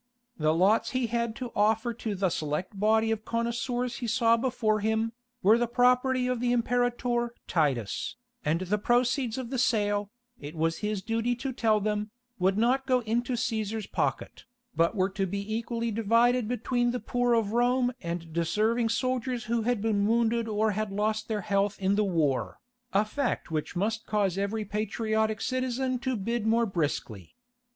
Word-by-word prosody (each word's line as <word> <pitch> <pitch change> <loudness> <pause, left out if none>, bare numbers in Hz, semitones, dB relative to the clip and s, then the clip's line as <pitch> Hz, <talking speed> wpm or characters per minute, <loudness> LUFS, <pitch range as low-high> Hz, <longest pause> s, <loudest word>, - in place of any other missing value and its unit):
The 155 0 +3
lots 190 +7 +3
he 255 - +1
had 235 0 -1
to 250 -3 -6
offer 220 +3 +2
to 220 -2 -4
the 190 0 +1
select 160 +7 -3
body 220 +2 +3
of 220 -1 -2
connoisseurs 235 +2 -2
he 240 - -4
saw 230 +1 +4
before 230 -3 0
him, 220 +2 0 0.3
were 220 +4 +6
the 240 - +1
property 250 +1 +3
of 250 -1 0
the 245 0 +1
Imperator 240 0 0
Titus, 135 - 0 0.3
and 160 +4 0
the 195 +3 0
proceeds 245 +1 +1
of 255 -2 -5
the 260 - -1
sale, 205 -4 +1 0.3
it 145 +3 -8
was 165 +1 0
his 210 -2 -2
duty 230 +2 0
to 260 +2 -4
tell 220 -3 +2
them, 210 +1 -1 0.3
would 190 +2 +2
not 255 +4 +2
go 255 -2 +3
into 240 +3 -1
Cæsar's 220 -2 -2
pocket, - - -3 0.3
but 170 +6 +2
were 190 -1 +2
to 195 0 -1
be 200 +3 -4
equally 230 0 -2
divided 230 +2 +3
between 245 +1 0
the 245 +1 -1
poor 245 -1 +1
of 220 -3 +1
Rome 245 +2 +2
and 170 -1 -5
deserving 215 +8 +1
soldiers 250 0 -1
who 230 +1 0
had 230 -2 0
been 205 -2 +2
wounded 230 0 +2
or 215 0 +1
had 215 0 -2
lost 215 +2 -1
their 215 -2 -2
health 200 +1 0
in 195 0 +2
the 210 +1 +2
war, 160 -9 0 0.3
a 200 +2 +3
fact 245 - -2
which 155 +1 -3
must 220 +5 -1
cause 205 -4 +1
every 200 +2 -2
patriotic 220 +1 -1
citizen 255 0 -1
to 260 +1 -1
bid 225 +2 -2
more 230 +1 +3
briskly. 145 - -3
220 Hz, 175 wpm, -28 LUFS, 200-240 Hz, 0.3 s, were